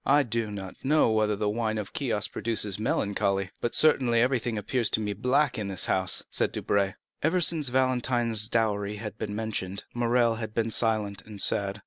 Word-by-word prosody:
"I 145 +1 +4
do 115 -2 -2
not 100 -2 -8
know 145 -3 +3
whether 110 -1 +1
the 105 +1 -2
wine 110 +1 -1
of 105 -2 -5
Chios 115 -7 0
produces 105 -4 -2
melancholy, 100 -3 0
but 120 - -1
certainly 125 -6 +4
everything 120 -2 +1
appears 115 +2 0
to 110 - +1
me 105 -1 -2
black 125 +4 +1
in 105 - -3
this 95 -2 -1
house," 95 -1 +1
said - - +2
Debray. 100 -2 0 0.3
Ever 165 +4 +2
since 160 -5 +2
Valentine's 120 -4 +1
dowry 105 -3 0
had 105 +1 -7
been 105 -1 -4
mentioned, 100 -3 -3
Morrel 120 -1 +2
had 110 -1 -6
been 115 -1 0
silent 105 -3 0
and 105 -2 -9
sad. 100 +1 0
110 Hz, 180 wpm, -27 LUFS, 105-120 Hz, 0.3 s, I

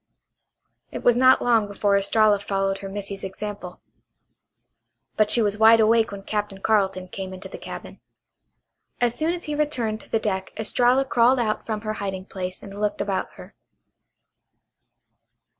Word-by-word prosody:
It - - -7
was 245 - +5
not 255 +1 +5
long 230 -4 +3
before 200 0 +1
Estralla 205 +1 +3
followed 195 -1 -1
her 195 - -7
missy's 200 0 -6
example. 195 -1 -7 1.3
But 215 -1 +2
she 235 - +4
was 205 0 0
wide 225 +1 +7
awake 225 0 +3
when 200 -1 -8
Captain 205 -1 -3
Carleton 195 -3 +1
came 190 0 -7
into 190 +1 -9
the - - -10
cabin. - - -9 1.0
As 240 -1 +2
soon 315 +5 0
as 350 - -9
he 300 - -4
returned 255 -8 -1
to - - -18
the - - +1
deck 190 -3 -3
Estralla 245 +4 +2
crawled 250 0 +3
out 220 -3 -1
from 215 -2 -3
her 215 0 -3
hiding 195 -3 -5
place 185 -1 -6
and 200 0 -9
looked 210 -1 -1
about 195 -2 -2
her. - - -13
210 Hz, 160 wpm, -24 LUFS, 195-230 Hz, 1.3 s, wide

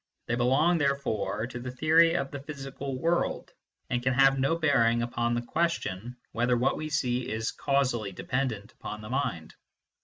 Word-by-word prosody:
They - - -2
belong 135 +8 +3
therefore 115 -7 0
to 125 0 -7
the 125 +1 -5
theory 160 +5 +4
of 135 -5 -1
the 140 - -5
physical 135 -1 -6
world, 170 +6 -1 0.3
and 120 - -1
can 130 +1 +1
have 135 0 +5
no 135 +5 +2
bearing 120 -7 +3
upon 120 0 -1
the 120 - -2
question 125 - -2
whether 120 +1 +1
what 130 +3 +2
we 155 0 -4
see 125 -4 0
is 110 +1 -2
causally 125 -7 0
dependent 110 0 -3
upon 105 - -7
the 105 - -9
mind. 125 - -2
130 Hz, 165 wpm, -28 LUFS, 120-140 Hz, 0.3 s, have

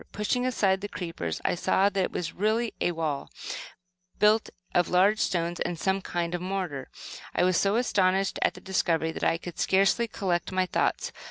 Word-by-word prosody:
Pushing 245 +5 0
aside 195 -6 +2
the 205 - -3
creepers 165 - -4
I - - +2
saw 190 +2 +2
that 195 -2 +1
it - - -6
was 165 -2 -3
really 220 +4 0
a - - +2
wall, 160 -4 -3 0.9
built 215 +1 +4 0.2
of 175 - +3
large 195 +4 +4
stones 170 -2 0
and 175 - -2
some 190 +3 0
kind 175 -2 -2
of 175 - -2
mortar. 180 -7 -3 0.5
I - - +3
was 185 0 +3
so 200 +4 +2
astonished 195 -5 +2
at - - +2
the - - -11
discovery 165 -4 0
that - - -7
I 165 - +3
could 175 0 -9
scarcely 195 +5 +3
collect 185 -5 -1
my 185 0 +1
thoughts. - - 0
185 Hz, 185 wpm, -27 LUFS, 175-200 Hz, 0.9 s, built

